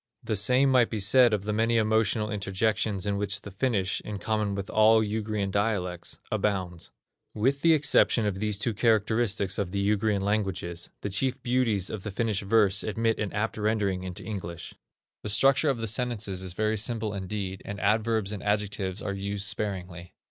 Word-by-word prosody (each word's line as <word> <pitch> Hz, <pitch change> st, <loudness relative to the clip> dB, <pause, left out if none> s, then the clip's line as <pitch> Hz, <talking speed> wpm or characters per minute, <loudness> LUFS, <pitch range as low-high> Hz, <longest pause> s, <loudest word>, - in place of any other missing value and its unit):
The 110 Hz, -, -1 dB
same 125 Hz, +7 st, +3 dB
might 125 Hz, -3 st, +4 dB
be 110 Hz, -, -3 dB
said 120 Hz, +5 st, +5 dB
of 105 Hz, -2 st, 0 dB
the 105 Hz, +1 st, -2 dB
many 115 Hz, +2 st, +2 dB
emotional 110 Hz, 0 st, +1 dB
interjections 100 Hz, 0 st, -1 dB
in 100 Hz, -1 st, 0 dB
which 100 Hz, -1 st, -2 dB
the 100 Hz, -, -9 dB
Finnish, 100 Hz, -3 st, -1 dB
in 105 Hz, -1 st, -5 dB
common 105 Hz, -1 st, -1 dB
with 100 Hz, -1 st, -4 dB
all 110 Hz, +1 st, +5 dB
Ugrian 105 Hz, -2 st, -2 dB
dialects, 95 Hz, -4 st, -2 dB
abounds. 90 Hz, -5 st, -2 dB, 0.5 s
With 135 Hz, +6 st, +1 dB
the 165 Hz, +1 st, +5 dB
exception 135 Hz, -5 st, +3 dB
of 100 Hz, -2 st, -2 dB
these 105 Hz, -1 st, 0 dB
two 115 Hz, +3 st, -2 dB
characteristics 110 Hz, -2 st, +1 dB
of 100 Hz, -3 st, -1 dB
the 100 Hz, +2 st, -3 dB
Ugrian 105 Hz, -1 st, +1 dB
languages, 95 Hz, -4 st, -2 dB
the 100 Hz, -, -4 dB
chief 130 Hz, +6 st, 0 dB
beauties 120 Hz, -6 st, +1 dB
of 110 Hz, -, -5 dB
the 105 Hz, -, -5 dB
Finnish 105 Hz, 0 st, -1 dB
verse 100 Hz, -1 st, +3 dB
admit 115 Hz, +1 st, -1 dB
of 105 Hz, -, 0 dB
an -, -, -15 dB
apt 110 Hz, +2 st, -2 dB
rendering 105 Hz, -3 st, 0 dB
into 90 Hz, -1 st, -7 dB
English. 85 Hz, -5 st, -6 dB, 0.5 s
The 105 Hz, -, -4 dB
structure 135 Hz, +7 st, +4 dB
of 135 Hz, -, 0 dB
the 115 Hz, -, -3 dB
sentences 110 Hz, -4 st, -1 dB
is 95 Hz, -2 st, -4 dB
very 110 Hz, +3 st, 0 dB
simple 110 Hz, -1 st, 0 dB
indeed, 95 Hz, -1 st, -4 dB
and 100 Hz, 0 st, -6 dB
adverbs 110 Hz, 0 st, +1 dB
and 105 Hz, -, -5 dB
adjectives 105 Hz, -2 st, -2 dB
are 100 Hz, -, -2 dB
used 100 Hz, 0 st, -3 dB
sparingly. 95 Hz, -5 st, -3 dB
105 Hz, 185 wpm, -27 LUFS, 100-110 Hz, 0.5 s, said